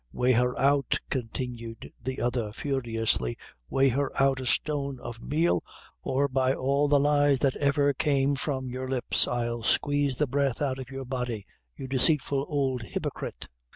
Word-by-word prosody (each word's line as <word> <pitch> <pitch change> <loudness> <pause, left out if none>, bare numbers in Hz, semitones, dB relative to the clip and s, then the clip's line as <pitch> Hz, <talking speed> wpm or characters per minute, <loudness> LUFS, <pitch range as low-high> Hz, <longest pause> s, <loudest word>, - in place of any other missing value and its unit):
"Weigh 125 +1 +2
her 125 +1 +2
out," 140 -1 +2
continued 120 -2 -5
the 130 +2 -3
other, 120 -3 -1
furiously; 115 - -1 0.3
"weigh 135 0 +3
her 140 +3 0
out 135 -1 +3
a 130 - -4
stone 140 -1 0
of 120 -1 -8
meal, 160 +7 +1 0.4
or 140 +2 +1
by 130 -1 +1
all 140 +2 +1
the 145 0 +4
lies 145 -1 +3
that 135 -2 +2
ever 145 0 +2
came 140 0 +2
from 135 -1 -2
your 130 +1 -5
lips, 130 -2 +2
I'll 120 -1 -2
squeeze 145 +2 +1
the 150 - +1
breath 140 -1 0
out 135 -2 -1
of 130 -1 -7
your 135 -1 -6
body, 125 -5 -3 0.3
you 135 - -6
deceitful 135 +1 +3
ould 135 -4 0
hypocrite." 110 - -5
135 Hz, 160 wpm, -27 LUFS, 125-140 Hz, 0.4 s, the